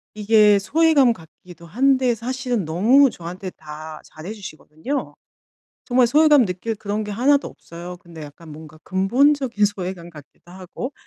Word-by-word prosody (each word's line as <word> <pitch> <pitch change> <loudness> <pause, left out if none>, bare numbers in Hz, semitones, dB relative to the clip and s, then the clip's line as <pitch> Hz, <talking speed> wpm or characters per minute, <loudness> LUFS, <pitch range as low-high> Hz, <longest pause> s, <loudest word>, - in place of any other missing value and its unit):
이게 210 -1 +4
소외감 295 +3 +3
같기도 170 0 -16
한데 255 - +2
사실은 245 -3 -3
너무 230 - +4
저한테 180 +3 -8
다 155 0 -10
잘해 160 +6 -10
주시거든요. 195 - -6 0.7
정말 250 -1 +3
소외감 295 +1 +5
느낄 185 +5 -4
그런 210 +1 -4
게 210 - -7
하나도 280 +6 +2
없어요. 175 +2 -11
근데 170 -2 -13
약간 150 +2 -12
뭔가 155 0 -13
근본적인 240 +4 +1
소외감 185 -3 -6
같기도 155 +2 -17
하고. 190 +8 -8
205 Hz, 325 characters per minute, -21 LUFS, 170-255 Hz, 0.7 s, 소외감